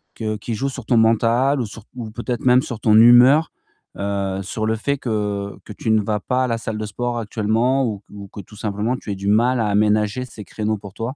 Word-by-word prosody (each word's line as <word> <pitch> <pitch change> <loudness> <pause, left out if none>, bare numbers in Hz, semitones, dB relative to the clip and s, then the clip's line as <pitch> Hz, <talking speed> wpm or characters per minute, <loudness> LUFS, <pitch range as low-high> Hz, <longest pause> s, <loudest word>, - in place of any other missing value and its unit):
que 110 -1 -3
qui 115 +3 -5
joue 135 +6 -2
sur 130 -4 -8
ton 120 - +2
mental 115 +5 +3
ou 120 - -2
sur 105 +1 -11
ou 115 -3 -6
peut-être 120 +2 -4
même 125 0 +5
sur 120 -4 -6
ton 105 0 +3
humeur, 120 +7 +7 0.5
heu, 100 -1 -2
sur 110 +3 -3
le 110 - +1
fait 140 +6 -1
que 105 -5 -3
que 105 - -9
tu 110 - -2
ne 110 -1 +4
vas 105 +1 -1
pas 130 0 0
à - - -2
la 115 -2 -1
salle 115 -1 -5
de 110 - -3
sport 120 +3 -3
actuellement 115 +5 0
ou 105 -4 -3
q - - -18
ou 100 -1 -9
que 100 - -9
tout 105 +2 -16
simplement 105 +4 -1
tu 105 - -7
aies 100 - -2
du 100 +1 -5
mal 120 +4 +3
à 110 - +1
aménager 105 +3 +1
ces 110 -5 -11
créneaux 110 0 -2
pour 100 -1 -11
toi? 115 +5 -5
110 Hz, 250 wpm, -21 LUFS, 105-120 Hz, 0.5 s, humeur